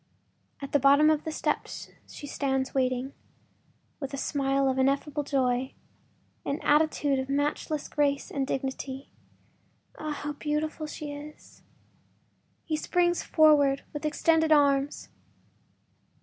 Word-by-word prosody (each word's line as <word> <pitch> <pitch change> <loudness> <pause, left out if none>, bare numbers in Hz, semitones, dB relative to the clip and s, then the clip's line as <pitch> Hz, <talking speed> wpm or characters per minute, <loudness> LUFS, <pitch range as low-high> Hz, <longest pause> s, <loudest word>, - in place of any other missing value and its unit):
At 275 - -6
the 290 - +3
bottom 285 +3 +6
of 305 -1 0
the 315 - -2
steps - - -3 0.2
she - - -9
stands 265 -2 -1
waiting, 255 0 0 0.9
with 275 -1 -4
a - - -6
smile 275 -1 0
of 265 0 0
ineffable 280 +2 +1
joy, 260 -2 0 0.7
an 280 - -2
attitude 295 -2 +2
of 265 0 -4
matchless 290 +1 -1
grace 285 -2 0
and 270 -1 -1
dignity. 270 0 -4 0.9
Ah, 310 - -4
how 295 0 -4
beautiful 305 +1 -2
she 300 -1 -6
is! 295 +1 -12 1.0
He 315 - -1
springs 345 +2 +1
forwards 290 -3 +4
with 295 - -5
extended 320 +1 +2
arms. 285 -1 +3
285 Hz, 120 wpm, -28 LUFS, 270-300 Hz, 1.0 s, bottom